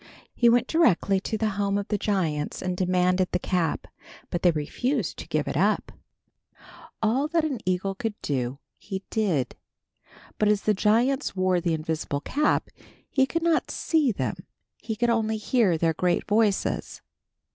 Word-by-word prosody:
He 235 - +4
went 240 +1 +4
directly 200 - +3
to 220 +3 -3
the 220 0 0
home 200 0 +1
of 200 - -4
the 210 - +1
giants 165 -8 -1
and 185 -1 -1
demanded 180 0 +1
the - - +2
cap, 180 -3 -1 0.5
but 175 - -2
they 180 - +5
refused 170 - -1
to - - -7
give - - -1
it - - -3
up. - - +1 1.1
All 250 +7 +2
that 325 0 +1
an 275 -6 -2
eagle 185 +2 0
could 220 +1 -4
do, 130 -2 -2 0.2
he 195 -1 -6
did, 175 - 0 0.8
but 215 - +3
as 210 -1 +2
the 215 - +3
giants 235 +6 +1
wore 185 -1 +2
the 170 -1 +1
invisible 155 -2 -3
cap 300 - 0 0.4
he 265 -1 +3
could 335 +3 -2
not 335 -1 +2
see 310 -6 +1
them. 200 - -4 0.3
He 220 - -4
could 240 +2 +1
only 220 -1 +1
hear 215 -5 +2
their 165 0 +1
great 180 +2 0
voices. 210 -2 0
200 Hz, 165 wpm, -26 LUFS, 180-235 Hz, 1.1 s, they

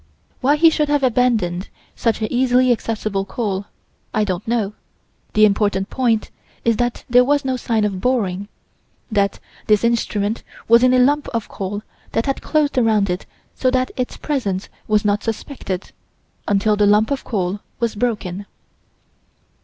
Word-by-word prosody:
Why 280 +3 +3
he 325 +2 +6
should 300 -1 0
have 290 -1 +2
abandoned 225 -8 +1 0.3
such 225 -1 0
easily 250 +2 +3
accessible 215 -4 -1
coal, 200 -1 -3 0.5
I 215 - +3
don't 185 0 -3
know. 220 -3 0 0.6
The 215 0 +6
important 205 -1 +1
point 235 -4 +1 0.3
is 230 -2 +3
that 245 -1 -1
there 245 +1 +6
was 285 +1 +1
no 260 -1 0
sign 225 -3 0
of 195 -3 -2
boring: 205 -6 0 0.6
that 200 -2 +1 0.3
this 210 0 +4
instrument 220 -2 0 0.3
was 235 +1 +6
in 255 0 +5
a - - +5
lump 285 +4 +3
of 230 - -2
coal 205 +2 -4 0.3
that 225 - +1
had 275 - -1
closed 295 -4 +1
around 215 -5 +2
it 180 - -4 0.3
so 255 - +1
that 255 0 0
its 250 -1 -3
presence 205 -11 -2 0.2
was 210 -1 +2
not 205 0 +2
suspected, 225 -4 -4 0.6
until 205 +1 +2
the 205 0 +3
lump 210 +4 +4
of 275 - -1
coal 195 -2 -2 0.2
was 235 -2 0
broken. 205 -4 -2
220 Hz, 155 wpm, -20 LUFS, 205-250 Hz, 0.6 s, he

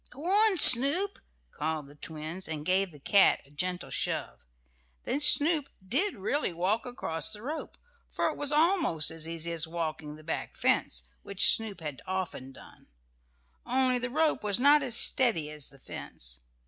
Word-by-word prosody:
"Go 285 +5 -11
on, 405 +2 +2
Snoop!" 290 +9 +8 0.3
called 155 -1 -5
the 140 - -16
twins, 160 +4 -8
and 155 -2 -7
gave 190 +1 0
the 150 - -15
cat 195 +8 +3
a 140 - -24
gentle 180 +4 -4
shove. - - -4 0.6
Then 285 - -3
Snoop 300 0 +5 0.2
did 335 - -1
really 220 +5 -3
walk 195 +9 -2
across 215 -6 -4
the 210 0 -6
rope, 305 +5 -7 0.3
for - - -2
it - - -7
was 290 0 0
almost 310 - +1
as 160 0 -7
easy 165 0 -5
as 165 -1 -3
walking 160 -2 -6
the 155 - -15
back 160 - -6
fence, - - -1 0.2
which 200 0 +3
Snoop 215 -5 -7
had 150 -4 -8
often 185 -8 -5
done. - - -17 0.8
Only 255 0 0
the 250 0 -5
rope 310 +1 -1
was 205 0 0
not 290 +3 +4
as 255 -4 -3
steady 170 - +2
as 150 -2 -7
the 135 - -19
fence. - - -4
190 Hz, 170 wpm, -27 LUFS, -, 0.8 s, Snoop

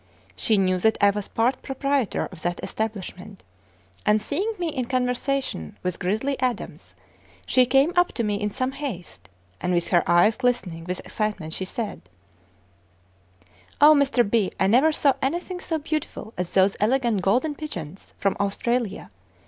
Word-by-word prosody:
She 220 -3 +2
knew 185 -1 +2
that 220 +4 +3
I 200 -1 +5
was 205 0 -4
part 245 +3 0
proprietor 275 -3 -1
of 175 -4 -9
that 175 +1 -2
establishment, 200 -3 -5 0.6
and 210 +1 +3
seeing 330 - -2
me 345 -2 -1
in 260 -5 -2
conversation 250 - -1
with 180 -1 -2
"Grizzly 220 +9 -1
Adams," 255 -2 -3 0.5
she 255 -1 +4
came 275 +6 +3
up 355 0 +4
to 235 - -1
me 205 -1 -1
in 210 - 0
some 255 +5 -2
haste, 260 -11 -7 0.3
and 180 0 0
with 170 - +1
her 175 - +4
eyes 175 +6 +5
glistening 240 -10 -1
with 180 +1 -4
excitement, 210 -7 -3
she 190 - -3
said: 215 +1 -4 1.8
"O, 300 +1 +9
Mr. 275 -5 +3
B., 205 -2 +1
I - - +3
never 255 +11 +5
saw 285 -2 +3
anything 350 +6 -2
so 325 -3 -2
beautiful 305 -7 -4
as 180 -1 -3
those 195 +1 +3
elegant 235 -2 +2
'Golden 245 - +2
Pigeons' 190 - -8
from 195 - 0
Australia. 200 - -1
225 Hz, 155 wpm, -24 LUFS, 190-270 Hz, 1.8 s, O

